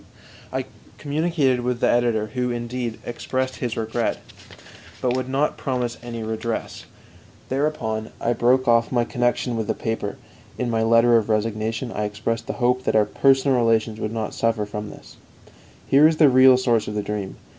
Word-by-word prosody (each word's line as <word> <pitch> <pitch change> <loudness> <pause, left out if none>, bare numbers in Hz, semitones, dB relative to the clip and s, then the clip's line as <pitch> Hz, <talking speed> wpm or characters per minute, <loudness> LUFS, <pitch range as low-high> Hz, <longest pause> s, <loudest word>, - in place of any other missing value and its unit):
I - - -2 0.3
communicated 145 -3 0
with 125 0 -2
the - - +2
editor, 120 -3 +2
who, 125 -1 -1
indeed, 120 -1 -4
expressed 130 +2 -3
his 120 -2 -3
regret, 115 +1 -1 0.8
but 125 -1 0
would 130 0 -3
not 140 +3 0
promise 125 -3 -2
any 115 -1 -6
redress. 110 +1 -4 0.6
Thereupon 130 -6 -2
I 120 - +1
broke 130 +2 +2
off 115 0 +3
my 120 -2 +2
connection 120 0 -1
with 110 -2 -2
the - - -1
paper; 110 +1 -3 0.4
in 125 -2 -2
my 115 -1 +1
letter 115 +1 +5
of 115 -1 -1
resignation 110 +2 -1
I 105 0 -2
expressed 115 +2 -3
the - - -2
hope 125 0 +1
that - - +1
our 105 -1 +5
personal 135 +4 +3
relations 115 -2 +1
would 110 - -3
not 110 -2 -3
suffer 115 -2 0
from 105 0 -6
this. - - -14 0.7
Here 145 +3 +6
is 160 0 0
the 150 -3 +6
real 130 0 +7
source 120 -3 +1
of 105 - -4
the 105 - -1
dream. 100 -2 -4
120 Hz, 175 wpm, -23 LUFS, 110-130 Hz, 0.8 s, real